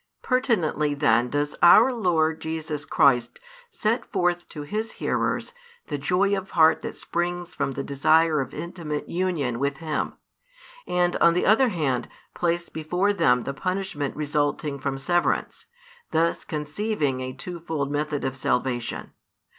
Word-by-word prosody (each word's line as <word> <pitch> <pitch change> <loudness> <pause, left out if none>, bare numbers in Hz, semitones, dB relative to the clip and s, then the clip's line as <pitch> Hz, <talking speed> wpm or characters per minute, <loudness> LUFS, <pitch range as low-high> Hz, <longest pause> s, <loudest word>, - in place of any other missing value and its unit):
Pertinently 180 - +1
then 125 -4 +3
does 145 +1 -1
our 220 +9 +7
Lord 160 -8 +1
Jesus 160 -2 -4
Christ 125 -4 +3 0.3
set 230 - -1
forth 175 -1 -1
to 150 - -7
His 215 +8 -3
hearers - - -1 0.3
the 145 -2 -4
joy 190 +7 +2
of 195 -1 -5
heart 160 -1 +4
that - - -6
springs 175 0 -3
from 135 - -2
the 140 - -4
desire 155 +3 +3
of 130 - -5
intimate 155 -2 -5
union 165 -10 -1
with 140 0 -1
Him, 155 -1 -2 0.7
and 175 0 +1
on 170 0 +4
the 180 - +1
other 240 +5 +5
hand 145 - -1 0.3
place 170 0 -1
before 180 +6 0
them 125 -10 +3
the 140 - -4
|388 - - -19
punishment 185 -7 -2
resulting 145 -1 -1
from 135 0 -2
severance, 175 +6 0 0.4
thus 165 +1 0
conceiving 150 -2 -2
a 130 0 -4
twofold 160 -2 -4
method 150 0 -2
of 130 0 -2
salvation. 125 -2 -2
160 Hz, 145 wpm, -25 LUFS, 140-180 Hz, 0.7 s, our